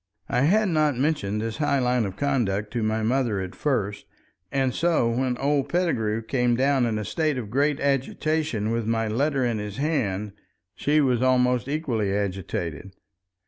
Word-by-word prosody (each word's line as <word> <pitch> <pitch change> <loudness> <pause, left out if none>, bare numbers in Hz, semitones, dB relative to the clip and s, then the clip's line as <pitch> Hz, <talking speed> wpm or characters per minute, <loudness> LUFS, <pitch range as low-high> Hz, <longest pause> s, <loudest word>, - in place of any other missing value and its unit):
I 125 - +1
had 210 +5 +3
not 155 -5 +2
mentioned 125 -8 0
this 115 0 -3
high 145 -2 +1
line 125 -3 +1
of 95 - -7
conduct 110 -8 -1
to 120 - -1
my 110 0 0
mother 120 -3 +1
at 95 -1 -5
first, 105 -9 -2 0.4
and 135 -2 +1
so 165 -9 +2
when 125 +1 0
old 140 0 0
Pettigrew 115 -12 0
came 125 0 +1
down 135 -1 +2
in 110 -2 -1
a 105 - -3
state 155 -4 0
of 110 -5 -5
great 145 +3 +1
agitation 140 -3 0
with 115 -1 -1
my 115 -1 0
letter 135 +4 +1
in 115 -3 -1
his 105 -1 -6
hand, 110 -10 -1 0.4
she 150 +1 +2
was 125 -4 +2
almost 125 -1 +2
equally 130 -9 -1
agitated. 95 -2 -3
125 Hz, 170 wpm, -25 LUFS, 110-140 Hz, 0.4 s, had